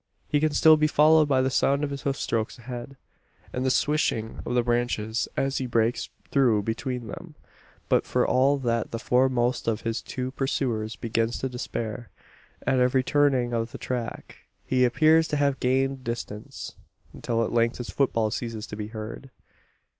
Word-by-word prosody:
He 145 - +2
can 155 +1 +2
still 155 +2 +6
be 155 0 +3
followed 155 +1 +5
by 130 -2 +3
the 130 - 0
sound 140 +2 +2
of 145 - -2
his 140 -1 -5
hoofstrokes 115 -5 -1
ahead, 120 +2 -8 0.6
and 125 - -2
the 130 - +2
swishing 130 -5 0
of 125 - -1
the 120 - +3
branches 120 -2 0
as 135 0 0
he 130 - -2
breaks 115 0 0 0.2
through 120 -7 +3
between 120 +3 -3
them; 110 - -9 0.5
but - - +2
for - - +1
all 135 +3 +3
that 115 -4 -1
the 115 - -4
foremost 125 0 +1
of 115 -1 0
his 115 -1 -2
two 130 0 -4
pursuers 120 -5 -2
begins 115 0 -1
to 130 - -3
despair. 120 -2 -5 0.6
At 130 - +2
every 125 +1 +3
turning 130 -4 +2
of 115 0 -2
the - - -5
track, 125 -2 -5 0.3
he 125 -1 +3
appears 160 +6 +4
to 150 - -1
have 140 -1 +1
gained 135 +1 0
distance; 115 -3 -6 0.4
until 115 -1 -1
at 115 - -3
length 115 0 +2
his 120 -6 -6
footfall 115 -2 +1
ceases 115 -2 -4
to 105 - -8
be 105 0 -5
heard. 110 +4 -7
125 Hz, 175 wpm, -26 LUFS, 115-135 Hz, 0.6 s, still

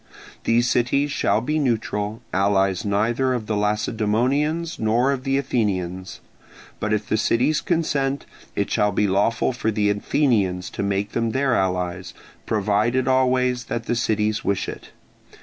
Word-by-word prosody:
These 120 +1 +3
cities 140 +5 +1
shall 105 -7 +1
be 150 +6 -1
neutral, 110 -4 -1
allies 95 -1 +2
neither 115 +6 +1
of 115 -3 -4
the 110 - -2
Lacedaemonians 120 +10 0
nor 115 +5 +2
of 135 -2 -3
the 135 0 +1
Athenians: 95 -8 -2 0.6
but 110 - -2
if 105 0 0
the 110 - +1
cities 125 +7 +2
consent, 145 -6 -1 0.3
it - - -1
shall 105 0 +2
be 105 - +1
lawful 105 +6 +1
for 115 -2 -1
the 105 -1 +1
Athenians 100 -5 0
to - - -4
make 100 +1 -1
them 115 -1 -1
their 135 -1 +1
allies, 90 -3 -1 0.3
provided 110 +5 +1
always 125 -1 +2
that 115 0 -4
the 120 - 0
cities 110 -2 0
wish 100 -1 -1
it. - - -8
110 Hz, 150 wpm, -22 LUFS, 100-130 Hz, 0.6 s, These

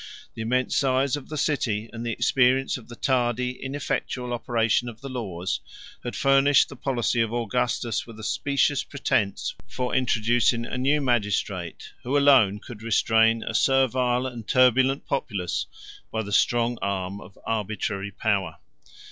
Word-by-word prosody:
The - - -7
immense 125 +3 0
size 135 0 +2
of 145 - -9
the 155 - -5
city, 115 -8 0
and 115 0 -6
the 120 - -2
experience 130 +3 +2
of 125 - -9
the 120 - -10
tardy, 125 -1 0
ineffectual 135 -2 -3
operation 120 0 0
of 115 -1 -11
the 135 - -7
laws, 95 -8 -3 0.4
had 120 - -5
furnished 135 0 +4
the - - -9
policy 120 -2 0
of 115 -1 0
Augustus 120 0 -1
with 115 -2 -11
a - - -9
specious 140 +4 +1
pretence 105 -7 -1
for 125 -2 -3
introducing 120 -1 +2
a - - -5
new 140 +4 +2
magistrate, 100 - -1
who 135 +4 0
alone 130 -9 +5
could 105 +1 -11
restrain 115 0 +3
a - - -4
servile 130 -2 +2
and 120 -4 -6
turbulent 130 +2 +3
populace 90 - -2 0.4
by 110 0 -2
the 100 -1 -6
strong 120 +2 +2
arm 100 0 -3
of 95 - -14
arbitrary 105 -2 -2
power. 100 -5 -1
120 Hz, 150 wpm, -25 LUFS, 110-130 Hz, 0.4 s, alone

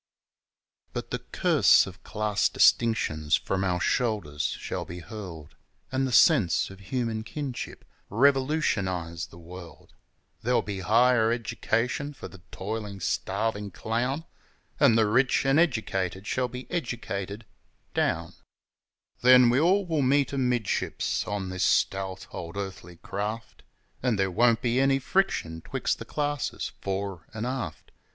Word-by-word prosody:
But - - -5
the - - -1
curse - - +4
of 95 -1 -11
class 105 -1 0
distinctions 80 -10 +3
from 95 0 -1
our 90 -2 0
shoulders 90 - 0
shall - - -4
be 85 - -8
hurled, 90 -5 -9 0.4
An' 130 0 +1
the 130 - -2
sense 120 - +4
of 95 - -12
Human 115 +2 -2
Kinship 140 -1 -6 0.2
revolutionize 105 - +1
the 85 - -15
world; 85 -2 -12 0.5
There'll 125 +2 +2
be 100 -2 -4
higher 115 +3 +4
education 120 +4 -1
for - - -8
the 95 - -14
toilin' 105 0 -5
starvin' 105 +3 -1
clown, 120 - -2 0.5
An' 110 - +6
the 115 -1 +4
rich 125 +6 +2
an' 135 +3 +4
educated 100 - 0
shall 125 +4 0
be 125 +1 -8
educated 110 - -4 0.5
down; - - 0 0.9
Then 125 -1 +7
we 125 - +3
all 185 +5 +3
will 160 -4 0
meet 140 +1 +2
amidships 125 -5 -1
on 100 -2 -3
this 95 0 -2
stout 95 -1 +1
old 85 +3 -7
earthly 95 -3 -6
craft, 105 +5 -5 0.4
An' 125 -3 +1
there 95 -1 0
won't 115 +4 +3
be 120 +1 +2
any 135 0 +4
friction 130 - 0
'twixt - - -2
the - - -7
classes 145 -2 -2
fore 95 -3 -4
'n' 110 +1 -3
aft. 125 -11 -5
110 Hz, 135 wpm, -27 LUFS, 95-125 Hz, 0.9 s, Then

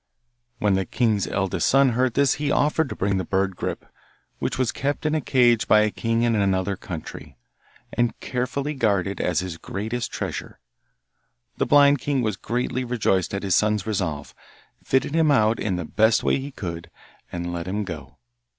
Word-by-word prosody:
When 105 -3 +2
the 95 0 0
king's 110 -5 +1
eldest 95 -2 0
son 135 0 +5
heard 125 0 0
this 140 0 +4
he 145 - 0
offered 150 +1 +2
to - - -5
bring 100 0 0
the 95 - -1
bird 95 +1 0
Grip, - - -4 0.5
which - - -2
was 125 -2 +1
kept 140 +3 -3
in 155 - +1
a 155 - +1
cage 120 -4 +3
by 105 - +6
a 105 0 +1
king 115 +2 0
in 120 -1 +2
another 100 -2 +1
country, 80 -7 -8 0.6
and 120 0 0
carefully 135 +4 -2
guarded 100 -7 0
as 90 -2 +1
his 90 -3 -6
greatest 110 +4 -4
treasure. - - -5 1.0
The - - 0
blind 145 -1 +6
king 135 -1 0
was 110 -3 0
greatly 125 +5 -2
rejoiced 110 -7 0
at 100 - -4
his 95 -2 +1
son's 105 -1 +2
resolve, 90 -9 -3 0.5
fitted 135 +2 +1
him 160 -1 +3
out 110 -5 +3
in 95 -4 -1
the 90 -2 -3
best 110 +6 +3
way - - +2
he 135 +2 -6
could, 85 -10 -6 0.4
and 85 0 -4
let 85 0 -4
him 105 +3 -2
go. 80 -7 -8
110 Hz, 180 wpm, -24 LUFS, 95-130 Hz, 1.0 s, by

